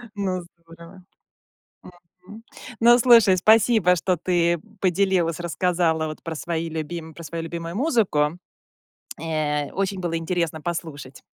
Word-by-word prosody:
Ну, 185 Hz, -3 st, -2 dB
здорово, 170 Hz, +2 st, -16 dB, 1.2 s
мгм. 210 Hz, +3 st, -12 dB, 0.4 s
Ну, 240 Hz, +1 st, +6 dB
слушай, 230 Hz, -6 st, +6 dB
спасибо, 215 Hz, -2 st, +4 dB
что 180 Hz, +1 st, 0 dB
ты 170 Hz, 0 st, +1 dB, 0.2 s
поделилась, 180 Hz, -3 st, +1 dB
рассказала 170 Hz, -1 st, 0 dB
вот 155 Hz, -, -8 dB
про 165 Hz, -1 st, -5 dB
свои 165 Hz, +1 st, -3 dB
любим 160 Hz, 0 st, -6 dB
про 170 Hz, -, -11 dB
свою 165 Hz, +2 st, -5 dB
любимую 170 Hz, +1 st, -6 dB
музыку. 200 Hz, -, +1 dB, 0.8 s
Э, 150 Hz, -3 st, -2 dB
очень 195 Hz, -1 st, -2 dB
было 170 Hz, -2 st, -2 dB
интересно 165 Hz, -2 st, -2 dB
послушать. 150 Hz, -6 st, -6 dB
170 Hz, 120 wpm, -23 LUFS, 160-190 Hz, 1.2 s, Ну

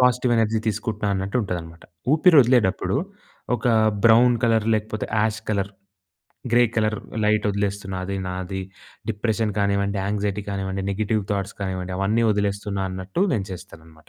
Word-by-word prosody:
Positive 125 Hz, 0 st, +3 dB
energy 110 Hz, 0 st, +2 dB
తీసుకుంటున్నా 110 Hz, 0 st, -2 dB
అన్నట్టు 95 Hz, +4 st, -2 dB
ఉంటదనమాట. 85 Hz, -3 st, -6 dB, 0.3 s
ఊపిరి 160 Hz, +2 st, +5 dB
ఒదిలేటప్పుడు 105 Hz, -6 st, +2 dB, 0.6 s
ఒక 115 Hz, -, -4 dB, 0.4 s
బ్రౌన్ 120 Hz, +2 st, +6 dB
కలర్, 110 Hz, -2 st, +2 dB
లేకపోతే 110 Hz, 0 st, -2 dB
ash 110 Hz, 0 st, 0 dB
colour, 100 Hz, -1 st, -1 dB, 0.8 s
grey 120 Hz, +1 st, +6 dB
colour 110 Hz, -1 st, +1 dB, 0.3 s
light 105 Hz, 0 st, +2 dB
వదిలేస్తున్న. 100 Hz, -1 st, -2 dB
అది 100 Hz, +1 st, -3 dB
నాది 95 Hz, +1 st, -4 dB, 0.5 s
డిప్రెషన్ 110 Hz, 0 st, -1 dB
కానివ్వండి, 100 Hz, 0 st, +1 dB
యాంక్సైటీ 105 Hz, 0 st, -1 dB
కానివ్వండి, 95 Hz, -1 st, -3 dB
నెగెటివ్ 105 Hz, +1 st, 0 dB
థాట్స్ 100 Hz, 0 st, -2 dB
కానివ్వండి, 95 Hz, -1 st, -3 dB
అవన్నీ 110 Hz, +4 st, +2 dB
వదిలేస్తున్నా 100 Hz, -1 st, -1 dB
అన్నట్టు 95 Hz, -, -2 dB
నేను 100 Hz, -3 st, -1 dB
చేస్తానన్నమాట. 80 Hz, -3 st, -12 dB
100 Hz, 130 wpm, -23 LUFS, 95-110 Hz, 0.8 s, బ్రౌన్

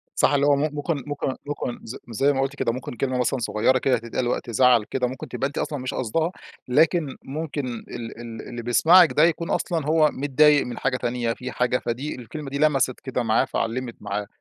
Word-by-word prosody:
صح -, -, +3 dB
اللي 140 Hz, 0 st, +3 dB
هو 145 Hz, -1 st, +5 dB
م 145 Hz, +2 st, 0 dB
ممكن 145 Hz, -2 st, -2 dB
ممكن 145 Hz, -2 st, -2 dB
ممكن 145 Hz, -4 st, -4 dB
ز 115 Hz, -, -7 dB
زي 135 Hz, +6 st, +2 dB
ما 135 Hz, -, 0 dB
قُلتِ 135 Hz, +1 st, -2 dB
كده، 115 Hz, -, 0 dB
ممكن 125 Hz, +1 st, -6 dB
كلمة 130 Hz, 0 st, -1 dB
مثلًا 125 Hz, +1 st, 0 dB
صغيّرة 115 Hz, +3 st, +2 dB
كده 130 Hz, 0 st, +2 dB
تتقال 115 Hz, +2 st, -3 dB
وقت 120 Hz, -, -2 dB
زعَل 120 Hz, 0 st, +4 dB
كده، 125 Hz, +2 st, -1 dB
ممكن 130 Hz, +2 st, -7 dB
تبقي 135 Hz, -, -2 dB
أنتِ 140 Hz, -, -10 dB
أصلًا 145 Hz, -, -2 dB
مش 130 Hz, 0 st, -4 dB
قاصْداها 160 Hz, +8 st, -1 dB, 0.4 s
لكن 155 Hz, +2 st, +2 dB
ممكن 145 Hz, -1 st, -4 dB
ال 115 Hz, -1 st, -7 dB
ال 115 Hz, -1 st, -7 dB
اللي 120 Hz, -1 st, -6 dB
بيسمَعك 160 Hz, +9 st, +6 dB
ده 150 Hz, -, +4 dB
يكون 170 Hz, 0 st, +1 dB
أصلًا 165 Hz, -5 st, -1 dB
هو 155 Hz, 0 st, +4 dB
متضايق 145 Hz, +1 st, +4 dB
من 125 Hz, -, -6 dB
حاجة 125 Hz, -1 st, 0 dB
تانية 120 Hz, -1 st, -1 dB
في 125 Hz, +1 st, -7 dB
حاجة 125 Hz, 0 st, +1 dB
فدي 125 Hz, +5 st, -4 dB
الكلمة 135 Hz, +4 st, -7 dB
دي 140 Hz, -, -3 dB
لمَسِت 135 Hz, -4 st, +2 dB
كده 130 Hz, -2 st, -3 dB
معاه 115 Hz, +3 st, +2 dB
فعلِّمت 120 Hz, 0 st, -3 dB
معاه 105 Hz, 0 st, -3 dB
130 Hz, 210 wpm, -24 LUFS, 120-145 Hz, 0.4 s, بيسمَعك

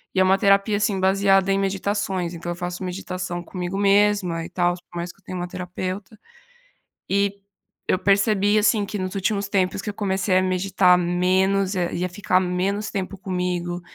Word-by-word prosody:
e -, -, +2 dB
é -, -, +6 dB
uma 190 Hz, +1 st, +4 dB
terapia 200 Hz, +1 st, +3 dB
assim, 205 Hz, -2 st, 0 dB
baseada 195 Hz, 0 st, +3 dB
em 195 Hz, -, +2 dB
meditações, 195 Hz, -2 st, -1 dB
então 170 Hz, 0 st, -5 dB
eu -, -, -4 dB
faço 175 Hz, +1 st, -5 dB
meditação 180 Hz, -1 st, -4 dB
comigo 180 Hz, +1 st, -5 dB
mesma 200 Hz, -4 st, +2 dB
e 175 Hz, -, -9 dB
tals, 175 Hz, 0 st, 0 dB
por 175 Hz, -, -9 dB
mais 170 Hz, +1 st, -4 dB
que -, -, -30 dB
eu -, -, -31 dB
tenha 185 Hz, +1 st, -6 dB
uma 175 Hz, -, -3 dB
terapeuta 185 Hz, +3 st, -6 dB, 0.9 s
e 200 Hz, 0 st, 0 dB, 0.5 s
eu -, -, +2 dB
percebi 200 Hz, +1 st, +3 dB
assim 210 Hz, -1 st, +2 dB
que 210 Hz, -, -5 dB
nos 185 Hz, 0 st, -4 dB
últimos 200 Hz, +1 st, -1 dB
tempos 190 Hz, -1 st, 0 dB
que 210 Hz, -, -3 dB
eu -, -, -8 dB
comecei 190 Hz, -2 st, +1 dB
a -, -, +2 dB
meditar 185 Hz, 0 st, +3 dB
menos 185 Hz, +3 st, +1 dB
e 175 Hz, 0 st, -1 dB
a -, -, -1 dB
ficar 185 Hz, 0 st, +1 dB
menos 190 Hz, +4 st, -1 dB
tempo 195 Hz, 0 st, -4 dB
comigo, 180 Hz, -2 st, -2 dB
190 Hz, 185 wpm, -23 LUFS, 180-200 Hz, 0.9 s, é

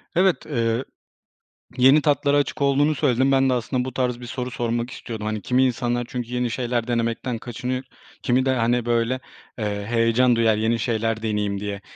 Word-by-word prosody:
Evet. 185 Hz, +1 st, +2 dB
Eee, 115 Hz, -3 st, -1 dB, 0.9 s
yeni 135 Hz, +4 st, +6 dB
tatlara 145 Hz, -1 st, +2 dB
açık 145 Hz, 0 st, 0 dB
olduğunu 140 Hz, +2 st, +3 dB
söyledin. 130 Hz, 0 st, +2 dB
Ben 135 Hz, 0 st, +3 dB
de -, -, +2 dB
aslında 125 Hz, +1 st, -1 dB
bu 130 Hz, -, -5 dB
tarz 125 Hz, -1 st, -1 dB
bir 120 Hz, -, -8 dB
soru 125 Hz, +2 st, -4 dB
sormak 120 Hz, 0 st, -2 dB
istiyordum. 110 Hz, -4 st, -6 dB
Hani, 110 Hz, -1 st, -3 dB
kimi 130 Hz, +1 st, +2 dB
insanlar 120 Hz, -1 st, 0 dB
çünkü 120 Hz, -1 st, -5 dB
yeni 125 Hz, -1 st, 0 dB
şeyler 120 Hz, -1 st, -1 dB
denemekten 115 Hz, 0 st, -1 dB
kaçınıyor, 125 Hz, +3 st, -4 dB, 0.4 s
kimi 130 Hz, +1 st, +2 dB
de, -, -, +3 dB
hani, 120 Hz, 0 st, +1 dB
böyle, 120 Hz, +2 st, +1 dB, 0.4 s
eee, 100 Hz, -2 st, -3 dB
heyecan 115 Hz, +2 st, +3 dB
duyar, 115 Hz, -2 st, +3 dB
yeni 110 Hz, +2 st, +1 dB
şeyler 115 Hz, -1 st, -1 dB
deneyeyim 105 Hz, -2 st, -1 dB
diye. 100 Hz, -1 st, -4 dB
120 Hz, 175 wpm, -23 LUFS, 115-130 Hz, 0.9 s, yeni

